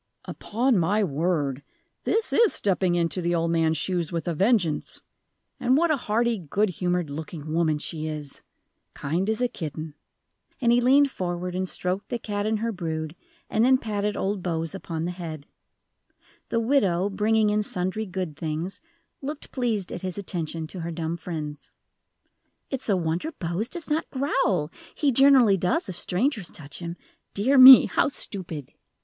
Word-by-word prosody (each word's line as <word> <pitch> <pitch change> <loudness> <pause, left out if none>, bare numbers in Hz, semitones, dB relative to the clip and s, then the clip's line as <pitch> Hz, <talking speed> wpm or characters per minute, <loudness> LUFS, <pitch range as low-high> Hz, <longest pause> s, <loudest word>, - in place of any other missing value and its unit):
"Upon 235 0 0
my 205 +6 +2
word, 150 -4 -1 0.4
this 450 +1 +1
is 460 -3 +4
stepping 185 -3 +1
into 170 +1 0
the 175 0 0
old 165 0 0
man's 160 -1 +2
shoes 175 0 -1
with 165 -2 -3
a 170 - 0
vengeance! 190 -3 0 0.6
And 255 +2 +3
what 335 +1 +3
a - - +4
hearty, 235 -2 0
good 190 +6 0
humored 180 -3 -1
looking 155 +1 -6
woman 160 -2 +2
she 155 +1 -4
is! 150 -2 -6 0.5
Kind 170 +8 -1
as 220 +2 -1
a 250 - +3
kitten," 155 - -6 0.7
and 235 -2 +3
he 240 +1 +4
leaned 275 +3 +5
forward 180 -2 -3
and 185 0 -2
stroked 185 +3 -3
the 240 - -1
cat 205 -2 -3
and 220 0 +1
her 230 0 0
brood, 160 -4 -4 0.3
and 220 - +1
then 260 +1 +5
patted 210 -3 -2
old 195 0 -1
Bose 165 -1 -2
upon 165 -4 -4
the 175 - -2
head. 160 -5 -7 1.0
The 230 - +1
widow, 200 -7 +2
bringing 210 +1 +2
in 210 0 +2
sundry 190 +2 -3
good 180 -4 -4
things, 160 +4 -4 0.4
looked 290 +2 -6
pleased 225 -7 -2
at - - -6
his 185 0 -4
attention 165 -4 -4
to 180 +4 -8
her 170 0 -4
dumb 165 0 -3
friends. 155 -3 -6 1.0
"It's 265 -4 -3
a 195 - +3
wonder 170 - -2
Bose 175 +7 -3
does 340 +1 -5
not 310 +2 0
growl; 250 - 0 0.2
he 290 -3 +2
generally 260 -6 +6
does 180 0 0
if 185 - -5
strangers 200 - -1
touch 145 -2 -10
him. 170 0 -6 0.4
Dear 260 +7 +3
me, 260 0 +12
how 335 -1 +1
stupid!" 175 - -5
185 Hz, 165 wpm, -25 LUFS, 165-225 Hz, 1.0 s, me